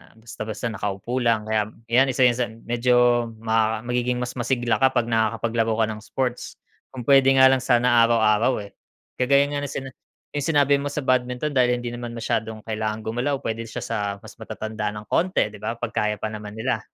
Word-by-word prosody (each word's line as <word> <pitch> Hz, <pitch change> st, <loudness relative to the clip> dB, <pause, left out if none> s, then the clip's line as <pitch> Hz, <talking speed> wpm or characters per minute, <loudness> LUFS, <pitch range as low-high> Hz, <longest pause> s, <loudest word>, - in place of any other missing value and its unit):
basta-basta 110 Hz, 0 st, -6 dB
nakaupo 105 Hz, +4 st, -3 dB
lang. 115 Hz, -3 st, +1 dB
Kaya 110 Hz, -1 st, +1 dB, 0.2 s
'yan 130 Hz, +3 st, +5 dB
isa 130 Hz, -, +3 dB
sa 120 Hz, 0 st, -1 dB
medyo 120 Hz, +1 st, +2 dB, 0.2 s
ma 110 Hz, -1 st, +1 dB
magiging 125 Hz, 0 st, -1 dB
mas 125 Hz, -, -4 dB
masigla 120 Hz, -1 st, 0 dB
ka 130 Hz, -1 st, +3 dB
'pag 120 Hz, -1 st, +1 dB
nakakapaglaro 115 Hz, 0 st, 0 dB
ka -, -, +3 dB
ng 110 Hz, -, -7 dB
sports. 125 Hz, +2 st, -3 dB, 0.4 s
Kung 125 Hz, -2 st, -6 dB
puwede 135 Hz, +1 st, +5 dB
nga 130 Hz, 0 st, +7 dB
lang 135 Hz, -, +3 dB
sana 120 Hz, -2 st, +4 dB
araw-araw, 110 Hz, 0 st, +2 dB
eh. 100 Hz, -, -12 dB, 0.5 s
Kagaya 140 Hz, +2 st, +4 dB
nga 145 Hz, -, -1 dB
nung 140 Hz, -, -6 dB
sina 135 Hz, 0 st, -5 dB, 0.4 s
'yung 145 Hz, -2 st, -3 dB
sinabi 145 Hz, -3 st, +3 dB
mo 140 Hz, -, -3 dB
sa 150 Hz, -, -2 dB
badminton 125 Hz, +3 st, 0 dB
dahil 125 Hz, -3 st, +3 dB
hindi 120 Hz, -, -4 dB
naman 120 Hz, 0 st, -6 dB
masyadong 110 Hz, -1 st, -2 dB
kailangan 110 Hz, 0 st, -3 dB
gumalaw, 120 Hz, +6 st, -1 dB
puwede 115 Hz, +1 st, -3 dB
siya -, -, -6 dB
sa 115 Hz, -, -3 dB, 0.3 s
mas -, -, -13 dB
matatanda 110 Hz, -1 st, -4 dB
ng 105 Hz, -, -7 dB
konti, 180 Hz, -, +1 dB
'di 105 Hz, -, -12 dB
ba? 115 Hz, -, -3 dB
'Pag 120 Hz, -1 st, -5 dB
kaya 105 Hz, -2 st, 0 dB
pa 110 Hz, -, -2 dB
naman 105 Hz, -1 st, -8 dB
nila. 110 Hz, 0 st, -1 dB
120 Hz, 190 wpm, -23 LUFS, 110-125 Hz, 0.5 s, nga